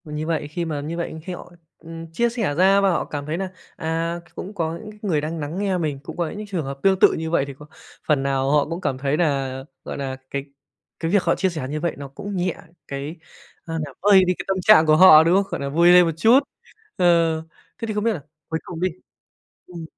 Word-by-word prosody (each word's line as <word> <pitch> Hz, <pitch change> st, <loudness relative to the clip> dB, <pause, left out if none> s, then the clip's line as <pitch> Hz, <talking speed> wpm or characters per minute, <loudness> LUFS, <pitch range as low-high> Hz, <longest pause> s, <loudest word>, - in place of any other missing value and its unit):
M 150 Hz, -1 st, -7 dB
như 155 Hz, +1 st, -3 dB
vậy, 160 Hz, -3 st, -1 dB
khi 170 Hz, +3 st, -4 dB
mà 150 Hz, -3 st, -3 dB
như 160 Hz, +4 st, -5 dB
vậy 170 Hz, -2 st, -4 dB
khi 185 Hz, -, -5 dB
họ, 180 Hz, -, -10 dB, 0.3 s
ừm, 165 Hz, 0 st, -10 dB
chia 235 Hz, +8 st, +1 dB
sẻ 225 Hz, -11 st, -2 dB
ra 195 Hz, +4 st, +5 dB
và 195 Hz, -, +3 dB
họ 170 Hz, -, 0 dB
cảm 145 Hz, -1 st, -5 dB
thấy 155 Hz, +3 st, -3 dB
nà, 190 Hz, 0 st, -3 dB, 0.3 s
à, 165 Hz, +1 st, -2 dB
c -, -, -26 dB
cũng 195 Hz, -, -7 dB
có 165 Hz, -3 st, -2 dB
những 215 Hz, +4 st, -10 dB
c 210 Hz, 0 st, -18 dB
người 165 Hz, -8 st, +1 dB
đang 160 Hz, +2 st, -4 dB
nắng 150 Hz, +3 st, -5 dB
nghe 195 Hz, -2 st, 0 dB
mình, 150 Hz, -5 st, -2 dB
cũng 160 Hz, -, -9 dB
có 170 Hz, -2 st, -1 dB
những 210 Hz, +5 st, -7 dB
trường 180 Hz, -7 st, -3 dB
hợp 135 Hz, 0 st, -6 dB
tương 190 Hz, -1 st, +3 dB
tự -, -, +6 dB
như 160 Hz, 0 st, -3 dB
vậy 160 Hz, -4 st, +1 dB
thì 140 Hz, -, -7 dB
có 150 Hz, +3 st, -14 dB, 0.4 s
phần 145 Hz, -3 st, +2 dB
nào 135 Hz, 0 st, 0 dB
họ 150 Hz, -1 st, +3 dB
cũng 170 Hz, +2 st, -4 dB
cảm 130 Hz, -, -1 dB
thấy 140 Hz, +2 st, -1 dB
nà, 135 Hz, -5 st, -1 dB, 0.2 s
gọi -, -, -6 dB
nà, 135 Hz, -1 st, -4 dB
cái 140 Hz, 0 st, -4 dB, 0.5 s
cái 165 Hz, 0 st, -2 dB
việc 200 Hz, -2 st, +3 dB
họ -, -, +2 dB
chia 190 Hz, -, +1 dB
sẻ 155 Hz, -7 st, -5 dB
như 155 Hz, +2 st, -3 dB
vậy 170 Hz, +2 st, -2 dB
nó 140 Hz, 0 st, -7 dB
cũng 200 Hz, +9 st, -7 dB
nhẹ 180 Hz, -1 st, -1 dB, 0.3 s
cái 140 Hz, +3 st, -5 dB, 0.5 s
a, 165 Hz, -, -6 dB
làm 140 Hz, -, -11 dB
vơi 195 Hz, -1 st, +6 dB
đi 180 Hz, -, +3 dB
cái -, -, -6 dB
tâm 195 Hz, -1 st, 0 dB
trạng 180 Hz, -4 st, +7 dB
của 155 Hz, 0 st, +5 dB
họ, 160 Hz, -3 st, +9 dB
đúng 170 Hz, +3 st, +3 dB
không? 200 Hz, -, +4 dB
Gọi 170 Hz, -, -3 dB
là, 140 Hz, -, -2 dB
vui 170 Hz, +4 st, +4 dB
lên 180 Hz, 0 st, +7 dB
một 165 Hz, -, 0 dB
chút. 225 Hz, +9 st, +6 dB, 0.6 s
Ờ, 170 Hz, -2 st, +3 dB, 0.4 s
thế 230 Hz, -, -4 dB
thì 215 Hz, -, -2 dB
không 210 Hz, 0 st, -1 dB
biết 230 Hz, -, +3 dB
là 175 Hz, -, -5 dB, 0.3 s
cuối 160 Hz, 0 st, -2 dB
cùng 170 Hz, -2 st, -7 dB
đi 185 Hz, -, +2 dB, 0.8 s
ừm, 170 Hz, -2 st, -9 dB
165 Hz, 265 wpm, -22 LUFS, 150-185 Hz, 0.8 s, họ